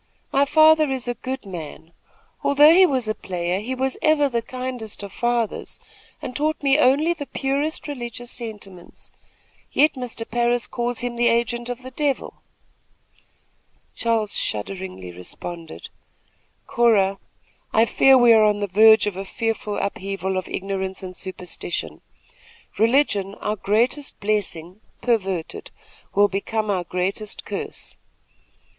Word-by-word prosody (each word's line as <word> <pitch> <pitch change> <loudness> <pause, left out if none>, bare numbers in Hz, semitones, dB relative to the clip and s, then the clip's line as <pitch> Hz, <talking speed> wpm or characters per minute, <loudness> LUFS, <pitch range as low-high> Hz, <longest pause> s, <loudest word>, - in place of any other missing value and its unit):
My 275 +1 +3
father 310 0 +5
is 260 -2 -3
a 245 - 0
good 260 +1 -6
man. 165 -2 -8 0.5
Although 295 +3 +7
he 370 +1 +7
was 260 -6 -1
a 215 - +1
player, 180 -2 -3
he 245 +5 -4
was 265 0 -1
ever 310 -2 +4
the 235 -3 -1
kindest 250 -3 -6
of 200 -1 -8
fathers, 240 -2 -1 0.4
and 250 - -5
taught 305 +1 -1
me 275 +1 +4
only 300 +5 +4
the 290 -4 -7
purest 280 +5 -2
religious 245 -3 -6
sentiments, 205 -6 -8 0.6
yet 300 +2 +4
Mr. 245 -3 -4
Parris 240 0 +1
calls 240 0 -3
him 245 -1 -3
the 240 0 +3
agent 240 +1 0
of 245 +1 -5
the 260 - -8
devil." 280 +1 -2 1.5
Charles 225 -3 0
shudderingly 110 - -4
responded: 160 - -7 0.8
"Cora, 200 -5 +3 0.5
I 225 +1 +4
fear 265 +3 +5
we 240 -2 +7
are 220 -1 +6
on 210 -1 +3
the 205 - 0
verge 220 +3 +6
of 205 -3 -2
a 195 - -4
fearful 215 0 -3
upheaval 195 -1 -3
of 185 0 -3
ignorance 190 0 -4
and 185 -1 -7
superstition. 180 -1 -5 0.8
Religion, 215 -5 +2
our 210 - -2
greatest 235 +8 0
blessing, 200 -3 -2 0.2
perverted, 195 -8 -1 0.5
will 205 +1 +6
become 210 +2 -2
our 180 -3 -1
greatest 190 +4 -3
curse. - - -5
225 Hz, 135 wpm, -23 LUFS, 195-255 Hz, 1.5 s, Although